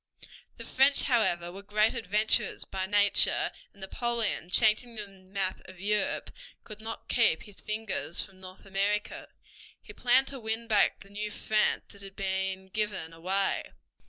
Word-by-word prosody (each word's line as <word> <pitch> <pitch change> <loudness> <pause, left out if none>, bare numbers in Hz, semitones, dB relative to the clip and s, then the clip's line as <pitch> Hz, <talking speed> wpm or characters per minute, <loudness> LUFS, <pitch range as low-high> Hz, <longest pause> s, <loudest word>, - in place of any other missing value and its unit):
The - - -8
French, 270 +2 +4
however, 175 -9 +2
were 195 +2 -9
great 210 +2 +2
adventurers 215 -1 +1
by 190 0 -3
nature, 205 0 +3 0.2
and 200 - -20
Napoleon, 225 -3 -2
changing 220 +5 +3
the 210 -2 -5
map 190 0 -4
of 185 -1 -13
Europe, 210 +2 -1 0.3
could 215 -1 -10
not 225 +1 -7
keep 225 -9 +3
his 205 -3 -12
fingers 215 -6 -3
from 195 -2 -3
North 185 +1 -12
America. 200 +2 -1 0.5
He - - -13
planned 255 +2 +3
to 275 - -5
win 225 0 -2
back 215 -3 +3
the 195 - -14
New 210 +1 -3
France 215 +1 +1
that 200 - -12
had 195 -1 -10
been 190 -1 -2
given 190 -5 -2
away. 190 +4 -1
205 Hz, 155 wpm, -29 LUFS, 190-220 Hz, 0.5 s, French